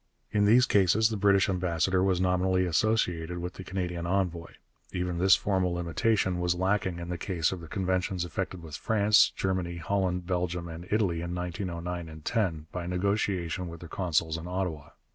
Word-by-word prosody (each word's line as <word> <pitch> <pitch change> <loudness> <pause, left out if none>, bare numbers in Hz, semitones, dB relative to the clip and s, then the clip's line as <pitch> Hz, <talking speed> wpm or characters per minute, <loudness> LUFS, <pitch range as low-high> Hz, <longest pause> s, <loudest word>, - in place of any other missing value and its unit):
In 105 -1 +3
these 120 +4 +6
cases 105 +2 +4
the 110 - -2
British 100 -1 +4
ambassador 90 -1 +1
was 95 -2 +2
nominally 95 0 +2
associated 90 -2 0
with 90 +1 -4
the 95 - -9
Canadian 90 -2 -3
envoy. 90 -3 -1 0.4
Even 90 -1 -2
this 95 +1 +6
formal 95 -3 0
limitation 90 +2 0
was 90 0 +1
lacking 95 -1 0
in 85 0 -6
the 90 -1 -3
case 90 -6 0
of 95 - -4
the 80 - -9
conventions 95 0 -1
effected 90 +1 -4
with 80 -2 -7
France, 105 +2 +4
Germany, 90 -2 -1
Holland, 90 0 -1
Belgium, 90 -1 -2
and 85 +1 -8
Italy 100 -6 +1
in 85 +1 -4
1909 90 -2 -4
10, 85 -6 -1
by 90 -1 -4
negotiation 90 -2 -1
with 85 -1 -8
their 85 - -9
consuls 80 -3 0
in 85 - -8
Ottawa. 90 -5 -3
90 Hz, 170 wpm, -28 LUFS, 85-95 Hz, 0.4 s, these